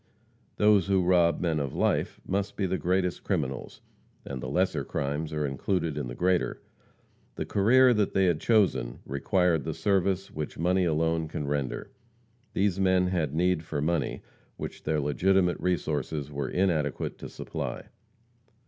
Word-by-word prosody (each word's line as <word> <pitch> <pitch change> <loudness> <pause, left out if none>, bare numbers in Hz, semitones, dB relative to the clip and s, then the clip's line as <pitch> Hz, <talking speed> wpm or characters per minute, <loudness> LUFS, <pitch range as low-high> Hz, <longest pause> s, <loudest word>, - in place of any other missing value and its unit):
Those 105 -4 +4
who 95 -2 +3
rob 85 -1 +3
men 80 -3 +1
of 70 -3 -3
life - - 0
must 100 +1 -2
be 100 - 0
the 95 0 -1
greatest 90 0 0
criminals, 70 -9 -3 0.4
and 65 -2 -5
the 65 - -4
lesser 90 -1 +1
crimes 75 +4 -3
are 75 -1 -1
included 80 +3 -1
in 75 -4 -3
the - - -6
greater. 90 0 +1 0.8
The - - -3
career 125 +5 +5
they 100 -3 +2
had 85 -4 +2
chosen 100 - +2
required 80 +4 +1
the 80 -2 -4
service 95 +2 0
which 75 -1 -5
money 90 +3 +2
alone 80 0 +1
can 75 -1 -4
render. 70 -3 -3 0.6
These 95 -1 +1
men 95 -1 +3
had 80 -6 -1
need 90 0 +2
for 80 -2 -4
money 80 +1 -1 0.3
which - - -6
their 80 -1 +1
legitimate 90 +5 +2
resources 75 -4 -2
were 70 -2 -3
inadequate 85 -6 0
to - - -7
supply. - - -5
85 Hz, 150 wpm, -28 LUFS, 75-95 Hz, 0.8 s, career